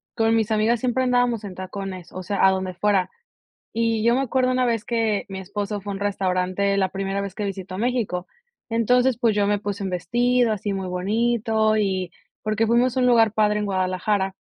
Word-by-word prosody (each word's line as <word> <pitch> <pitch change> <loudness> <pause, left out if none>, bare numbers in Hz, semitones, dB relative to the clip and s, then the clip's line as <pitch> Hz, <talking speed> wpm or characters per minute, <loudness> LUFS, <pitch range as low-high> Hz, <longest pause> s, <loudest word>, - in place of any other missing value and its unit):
con 225 -1 +2
mis 220 -1 0
amigas 220 +2 +2
siempre 255 +2 0
andábamos 245 -3 +1
en 195 -3 -7
tacones, 185 -1 -7
o 185 - -5
sea, 195 +1 +1
a 190 - +6
donde 190 -1 -2
fuera. 190 0 +1 0.6
Y 225 -1 0
yo 235 +1 +4
me 265 - +1
acuerdo 255 -1 +1
una 255 0 +2
vez 230 -3 0
que 225 -3 0
mi 190 -1 -5
esposo 205 +2 -4
fue 200 +1 -5
a - - -4
un - - -6
restaurante 195 0 0
la 190 -1 +2
primera 195 +1 -3
vez 200 -2 -5
que 210 - -3
visito 190 -1 -5
México. 220 -6 -1 0.4
Entonces, 245 +2 +2
pues 230 -4 +2
yo 205 -1 +2
me 205 0 +2
puse 205 -1 -4
un 190 - -2
vestido 240 +7 +1
así 205 -1 -2
muy 190 -1 -3
bonito 220 +3 +1
y 190 -4 -1 0.3
porque 215 +1 0
fuimos 240 +2 +2
a - - +1
un 250 - +3
lugar 225 -3 +4
padre 210 -1 +2
en 210 - -1
Guadalajara, 190 +1 0
210 Hz, 205 wpm, -23 LUFS, 190-230 Hz, 0.6 s, a